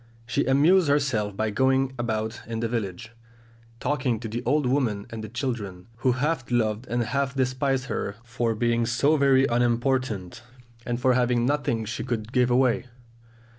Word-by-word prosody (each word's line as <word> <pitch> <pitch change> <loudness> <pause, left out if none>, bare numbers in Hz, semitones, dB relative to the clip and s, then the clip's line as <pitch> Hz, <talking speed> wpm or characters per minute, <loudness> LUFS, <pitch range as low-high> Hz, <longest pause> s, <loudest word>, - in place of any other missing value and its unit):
She 125 - 0
amused 155 +7 +4
herself 130 -9 +1
by 110 0 0
going 130 +3 +2
about 110 -1 -2
in 115 -1 -3
the 115 - 0
village, 115 -1 -4 0.7
talking 130 -4 0
to 115 - -5
the 115 +2 -4
old 145 +3 +2
women 120 -6 0
and 110 -1 -6
the 110 - -6
children, 110 -7 -4
who 125 +1 +2
half 135 0 -1
loved 115 0 0
and 120 0 0
half 135 +4 -1
despised 130 0 0
her 100 -6 -3
for 115 -1 -1
being 115 +1 +1
so 140 +6 +3
very 135 -2 +4
unimportant, 120 -4 0 0.5
and 120 0 -1
for 130 0 +3
having 120 -1 +2
nothing 125 -5 0
she 110 +1 -4
could 115 -2 -3
give 125 -1 +3
away. 125 0 +2
120 Hz, 165 wpm, -25 LUFS, 115-135 Hz, 0.7 s, amused